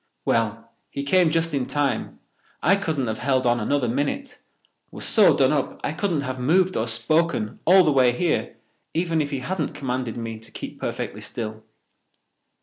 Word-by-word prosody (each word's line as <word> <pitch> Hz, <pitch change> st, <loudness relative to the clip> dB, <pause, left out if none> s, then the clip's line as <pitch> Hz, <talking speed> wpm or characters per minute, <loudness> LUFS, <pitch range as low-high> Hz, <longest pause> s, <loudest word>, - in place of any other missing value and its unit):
"Well, 115 Hz, 0 st, 0 dB, 0.2 s
he 140 Hz, -, -4 dB
came 175 Hz, +4 st, +4 dB
just 165 Hz, 0 st, 0 dB
in 135 Hz, -3 st, -1 dB
time. 145 Hz, -1 st, -1 dB, 0.5 s
I 185 Hz, +6 st, +5 dB
couldn't 160 Hz, -9 st, -1 dB
have 110 Hz, -1 st, -3 dB
held 130 Hz, -1 st, +1 dB
on 120 Hz, 0 st, +3 dB
another 130 Hz, +3 st, 0 dB
minute—was 145 Hz, -, -5 dB
so -, -, +5 dB
done -, -, +4 dB
up -, -, -2 dB
I -, -, -1 dB
couldn't 175 Hz, -8 st, -1 dB
have 130 Hz, -2 st, -4 dB
moved 180 Hz, +8 st, +2 dB
or 110 Hz, -, 0 dB
spoken 120 Hz, 0 st, 0 dB
all 185 Hz, +2 st, +7 dB
the 155 Hz, -, +3 dB
way 130 Hz, -3 st, +4 dB
here 160 Hz, +7 st, -1 dB, 0.4 s
even 165 Hz, -1 st, +1 dB
if 145 Hz, -, -2 dB
he 140 Hz, -3 st, -3 dB
hadn't 155 Hz, +3 st, -3 dB
commanded 125 Hz, -3 st, -3 dB
me 115 Hz, -1 st, -5 dB
to 115 Hz, 0 st, -15 dB
keep -, -, -8 dB
perfectly -, -, -4 dB
still." 110 Hz, -1 st, -6 dB
140 Hz, 170 wpm, -24 LUFS, 120-165 Hz, 0.5 s, all